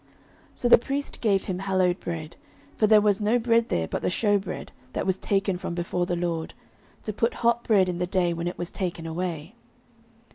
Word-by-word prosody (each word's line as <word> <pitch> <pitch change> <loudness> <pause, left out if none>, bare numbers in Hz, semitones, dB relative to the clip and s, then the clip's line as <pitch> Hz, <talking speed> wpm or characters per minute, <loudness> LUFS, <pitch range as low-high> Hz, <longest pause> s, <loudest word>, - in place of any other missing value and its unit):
09:021:006 - - -31 0.5
So 245 - 0
the 240 - +9
priest 275 +4 -4
gave 200 -4 +2
him 185 -2 -3
hallowed 185 -2 +1
bread: 160 -1 -5 0.4
for 215 - +3
there 215 0 +7
was 205 -1 +2
no 215 +4 +3
bread 230 -1 +2
there 80 -1 0
but - - -3
the - - 0
shewbread, 205 +1 -1 0.2
that - - -2
was 190 0 0
taken 195 -2 0
from 170 - -4
before 175 +1 -1
the 175 - 0
LORD, 170 -2 -3 0.5
to 215 - -3
put 230 +3 0
hot 235 0 +3
bread 200 -4 +4
in 175 -1 -2
the 180 - 0
day 180 -2 +1
when 170 +1 -3
it 175 - -4
was 175 0 -4
taken 175 -3 -4
away. 165 +1 -4
185 Hz, 210 wpm, -26 LUFS, 175-215 Hz, 0.5 s, the